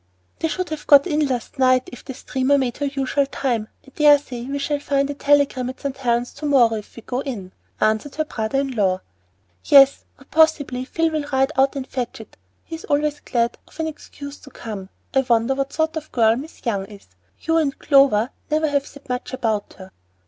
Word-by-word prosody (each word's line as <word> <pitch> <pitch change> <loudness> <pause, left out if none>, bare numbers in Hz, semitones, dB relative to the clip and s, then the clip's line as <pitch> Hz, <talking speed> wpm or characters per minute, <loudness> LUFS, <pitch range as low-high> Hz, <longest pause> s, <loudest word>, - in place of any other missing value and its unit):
"They 325 - 0
should 360 +4 -3
have 310 -1 -6
got 280 -1 +7
in 305 -4 +1
last 255 +1 -4
night 255 -1 +4
if 245 - -11
the 265 - -8
steamer 265 +2 +1
made 255 -3 -1
her 285 - -1
usual 275 0 0
time. 240 -6 -2 0.2
I 270 - -17
dare 295 -1 +7
say 245 -4 -8
we 275 +2 -3
shall 285 +1 -1
find 280 -1 0
a - - -3
telegram 280 -3 +2
at 260 - -8
St. 280 -2 -3
Helen's 245 -2 -1
to 295 +1 -5
morrow 250 -5 +4
if 210 - -10
we 230 - -11
go 250 - -3
in," 220 -10 -5 0.3
answered 220 +6 0
her 310 - -1
brother 235 0 -1
in 275 -1 -3
law. 190 -6 +1 0.6
"Yes, 275 0 +6
or 270 - -18
possibly 290 -5 +2
Phil 325 +3 0
will 305 -2 -2
ride 270 +1 +2
out 270 +1 +3
and 270 -2 -4
fetch 250 -4 -4
it. 220 - -13 0.3
He - - -11
is - - -11
always 295 0 0
glad 235 -2 -1
of - - -19
an 320 - 0
excuse 290 -2 -8
to 275 - -14
come. 205 -7 -8 0.2
I 270 - +4
wonder 235 0 +2
what 275 0 -2
sort 315 0 -1
of 310 -1 -6
girl 225 -2 +4
Miss 285 +5 -9
Young 200 -5 -1
is. 205 -1 -14 0.3
You 325 0 +1
and 290 -4 0
Clover 275 -5 +4 0.2
never 310 0 +1
have 285 -1 0
said 285 0 -15
much 250 0 -4
about 220 -5 -2
her." 190 -1 -12
275 Hz, 215 wpm, -22 LUFS, 240-290 Hz, 0.6 s, got